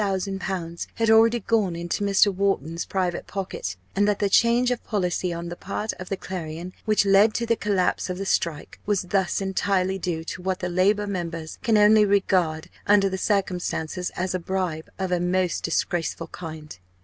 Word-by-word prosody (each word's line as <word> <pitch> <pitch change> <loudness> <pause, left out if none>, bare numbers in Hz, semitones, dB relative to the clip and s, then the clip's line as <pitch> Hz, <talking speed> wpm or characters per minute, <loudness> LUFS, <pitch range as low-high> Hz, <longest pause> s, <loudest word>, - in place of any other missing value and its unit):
_ 190 -3 -3
had 225 -1 +2
already 225 +2 +5
gone 215 -7 +1
into 170 +4 -3
Mr. 200 0 +4
Wharton's 175 -4 -1
private 180 -3 -2
pocket; 185 - -4 0.2
and 205 +1 +3
that 205 -1 +2
the 200 -1 0
change 240 +3 +4
of 245 - -2
policy 180 -3 -1
on 170 0 -5
the 175 - -5
part 210 +4 -4
of 185 - -7
the 195 - -2
Clarion, 175 -1 -6
which 215 -2 +3
led 200 +2 +5
to 235 - 0
the 230 0 +2
collapse 200 -4 0
of 180 - -3
the 195 - -4
strike, 170 -5 -1
was 205 -3 +1
thus 190 +1 0
entirely 190 0 0
due 170 -3 -2
to 170 +2 -6
what 185 0 -1
the 180 - -2
Labour 200 +4 +2
members 170 -5 -5
can 225 -2 +3
only 210 +1 +6
regard 185 -6 +1 0.2
under 200 -1 +5
the 190 - -3
circumstances 180 -3 -1
as 185 +1 -2
a 185 - -1
bribe 180 -3 -3
of 190 -1 -2
a 180 - +2
most 180 0 0
disgraceful 165 -1 -1
kind. 155 - -8
190 Hz, 185 wpm, -24 LUFS, 175-205 Hz, 0.2 s, only